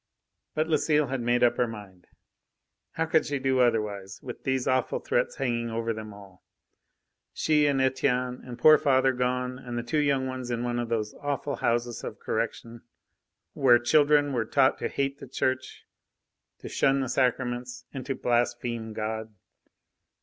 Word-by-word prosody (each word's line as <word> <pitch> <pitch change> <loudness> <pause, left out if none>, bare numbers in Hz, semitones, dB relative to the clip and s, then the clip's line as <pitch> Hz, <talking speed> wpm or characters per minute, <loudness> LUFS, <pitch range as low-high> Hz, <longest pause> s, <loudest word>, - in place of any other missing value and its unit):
But 155 +1 +1
Lucile 150 -2 +2
had 135 -2 -2
made 120 +1 +2
up 120 - +3
her 125 - +2
mind. 100 -5 -10 0.9
How 160 +1 0
could 160 0 +3
she 145 - -2
do 130 -1 +1
otherwise, 105 -5 0
with 125 - -8
these 130 -1 0
awful 130 0 +1
threats - - -1
hanging 120 -3 -1
over 115 0 -2
them 110 -1 -7
all? 100 -2 -15 0.9
She 150 -1 +2
and 140 -2 +1
Etienne 125 -1 0
and 125 -2 -8
poor 155 +4 +7
father 130 -1 +3
gone, 125 0 -1
and 120 -2 -6
the 120 - -2
two 150 +6 0
young 140 -3 +1
ones 130 -1 -5
in 120 0 -2
one 120 0 -1
of 120 -1 -3
those 110 -2 -2
awful 145 0 -2
Houses 120 0 -1
of - - -6
Correction, 115 0 -3 0.7
where 125 -3 +5
children 145 +3 +3
were 120 -3 +1
taught 130 +4 +2
to - - -1
hate 140 0 -2
the - - -9
Church, 130 +1 -2 0.8
to - - -7
shun 135 0 +2
the 130 - -2
Sacraments, 125 -1 -1
and 135 -2 -5
to 135 - -1
blaspheme 120 -2 -1
God! 110 0 -4
125 Hz, 165 wpm, -27 LUFS, 120-135 Hz, 0.9 s, poor